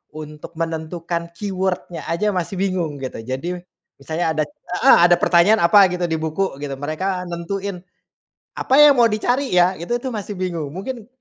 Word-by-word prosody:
untuk 155 +2 -9
menentukan 165 +1 -4
keyword-nya 185 -2 -3
aja 210 +5 0
masih 185 +1 -3
bingung 180 -6 -1
gitu. 130 - -5
Jadi 160 +9 -4 0.4
misalnya 160 +5 -3
ada 155 - +1
heeh, 180 +4 +3
ada 175 - +5
pertanyaan 180 +6 +4
apa 195 +2 +7
gitu 180 -1 -1
di 160 - -1
buku 160 +2 -2
gitu 140 -2 -5
mereka 180 +5 -2
nentuin 185 +2 -4 0.8
apa 260 - -1
yang 295 -1 +8
mau 235 - +6
dicari 245 +6 0
ya, 180 +1 +4
itu 175 +8 -3
tuh 260 - -3
masih 210 -2 -5
bingung. 170 -6 -3
Mungkin 225 +3 -6
180 Hz, 160 wpm, -20 LUFS, 160-195 Hz, 0.8 s, yang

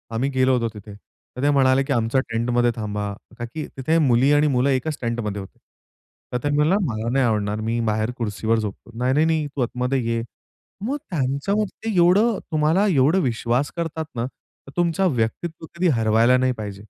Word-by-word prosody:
आम्ही 135 +4 0
गेलो 130 -1 +2
होतो 115 -1 0
तिथे, 105 0 -10
तर 125 +4 -14
ते 145 - +4
म्हणाले 135 -1 +4
की 135 - -1
"आमच्या 120 +3 +1
टेंटमध्ये 120 +1 +1
थांबा." 105 -2 -3 0.3
ताकी 120 +6 -5
तिथे 155 +5 +1
मुली 125 +4 +4
आणि 145 +1 +4
मुलं 130 -1 +2
एकच 140 +3 0
टेंटमध्ये 115 -4 -2
होते. 95 - -12 0.8
तर 125 - +2
तो 145 0 0
म्हणाला, 150 +5 +3 0.2
"मला 110 +2 -3
नाही 135 0 +2
आवडणार 105 -2 0
मी 115 +1 0
बाहेर 110 +2 -1
खुर्चीवर 110 0 0
झोपतो." 105 +2 -6
"नाही, 125 +2 +1
नाही, 150 +2 +3
नाही, 160 -2 +1
तू 140 -1 -5
आतमध्ये 125 +2 0
ये." 115 0 -1 0.6
मग 275 +4 -1
त्यांच्यामध्ये 190 +9 -1
एवढं, 195 +5 +4
तुम्हाला 160 +6 +2
एवढा 155 +1 +3
विश्वास 125 -1 0
करतात 160 -1 -3
ना, 115 - -1
तर 135 +1 -15
तुमचं 175 +2 +2
व्यक्तित्व 155 +9 -2
कधी 180 +1 +1
हरवायला 115 +3 +4
नाही 130 0 +2
पाहिजे. 100 -2 -6
130 Hz, 180 wpm, -22 LUFS, 115-150 Hz, 0.8 s, ते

